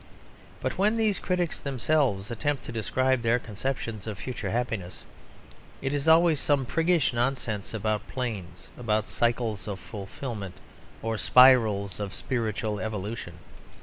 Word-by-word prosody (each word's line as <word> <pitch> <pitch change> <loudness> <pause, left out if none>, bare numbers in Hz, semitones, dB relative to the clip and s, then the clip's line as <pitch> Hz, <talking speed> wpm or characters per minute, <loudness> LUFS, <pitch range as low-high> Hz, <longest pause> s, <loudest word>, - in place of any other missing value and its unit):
But - - -2
when 210 +3 +3
these 215 -4 +2
critics 180 -2 -1
themselves 130 -6 0
attempt 145 +4 -1
to - - -7
describe 130 +3 +1
their 115 +1 +3
conceptions 115 -1 -4
of 105 -3 -4
future 125 +4 -4
happiness, 115 -6 -3 0.8
it 135 +1 -2
is 145 +1 -2
always 160 -1 +6
some 140 -3 +2
priggish 165 0 +2
nonsense 120 -4 -1
about 110 -1 -1
"planes," 105 -9 -5
about 110 -2 0
"cycles 115 -4 0
of 100 -2 -4
fulfilment," 100 -1 -6 0.5
or 115 -1 -1
"spirals 110 -7 +5
of 100 -2 -4
spiritual 110 -4 -2
evolution." 105 -4 -4
115 Hz, 130 wpm, -27 LUFS, 105-135 Hz, 0.8 s, always